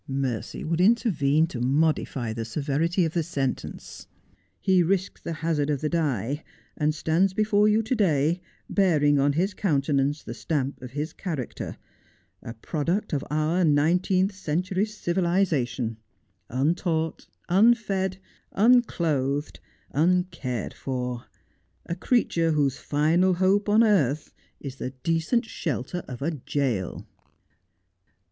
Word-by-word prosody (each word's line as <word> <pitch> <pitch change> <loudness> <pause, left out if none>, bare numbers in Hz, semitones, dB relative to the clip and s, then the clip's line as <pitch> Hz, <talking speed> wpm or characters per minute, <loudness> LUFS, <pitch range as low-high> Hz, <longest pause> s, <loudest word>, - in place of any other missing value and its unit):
Mercy 135 -4 -3
would 165 +2 0
intervene 175 - +3
to 135 -8 -6
modify 135 -3 0
the 115 0 -4
severity 150 - 0
of 160 - -3
the 170 - +1
sentence. 140 -5 -4 0.5
He 190 -2 +3
risked 190 +2 -1
the - - -4
hazard 150 -3 +1
of 145 -2 0
the 150 - 0
die, 145 - -1 0.3
and 150 0 0
stands 175 +5 +1
before 210 0 +3
you 215 +1 +3
to 220 - -1
day, 170 - +2 0.3
bearing 150 -7 +3
on 140 +1 +3
his 185 +7 0
countenance 145 -5 0
the - - -6
stamp 140 0 -2
of 125 - -7
his 150 +3 -3
character, 155 - -5 0.6
a 115 - -8
product 165 - -2
of 140 - 0
our 155 +4 +1
nineteenth 180 +6 +2
century 185 +3 -1
civilization, 170 - 0 0.5
untaught, 160 +4 -1 0.2
unfed, 195 -2 +3 0.4
unclothed, 160 - +2 0.3
uncared 165 - 0
for, 125 -2 -4 0.6
a - - -3
creature 170 -5 +1
whose 140 -3 +1
final 165 +5 +2
hope 195 +3 +2
on 215 +2 +5
earth 155 - +1 0.3
is 135 -2 -7
the 130 - -4
decent 165 +9 +1
shelter 165 - -3
of 125 +1 -6
a 165 - 0
jail.' 130 - -2
160 Hz, 125 wpm, -26 LUFS, 140-185 Hz, 0.6 s, on